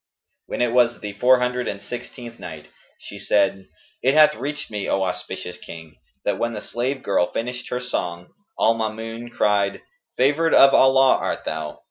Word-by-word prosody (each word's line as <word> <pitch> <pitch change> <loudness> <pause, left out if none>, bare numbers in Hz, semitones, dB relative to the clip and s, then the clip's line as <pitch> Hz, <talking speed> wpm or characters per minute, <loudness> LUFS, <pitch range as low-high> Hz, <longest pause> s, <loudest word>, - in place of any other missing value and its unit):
When - - -1
it 120 - +1
was 120 -1 +3
the 105 -1 -6
Four 125 +5 +4
Hundred 125 0 -1
and 100 - -4
Sixteenth 120 +1 -9
Night, 80 -4 -9 0.3
She - - -11
said, 95 -2 +1 0.3
It 135 +3 +2
hath 155 -1 +7
reached 140 +3 -6
me, 105 -2 -3
O 95 - +1
auspicious 90 -1 -5
King, 80 -2 -11 0.3
that 100 -2 0
when 120 0 -1
the 105 - -4
slave 130 +5 -3
girl 95 -3 +1
finished 125 +2 -4
her 125 - -2
song, 90 -8 -4 0.3
al 115 - +4
Maamun 115 +1 -5
cried, 100 -3 +1 0.3
"Favoured 145 +5 +3
of 135 0 +7
Allah 135 0 +5
art - - -3
thou! 80 -1 -5
115 Hz, 170 wpm, -22 LUFS, 100-125 Hz, 0.3 s, hath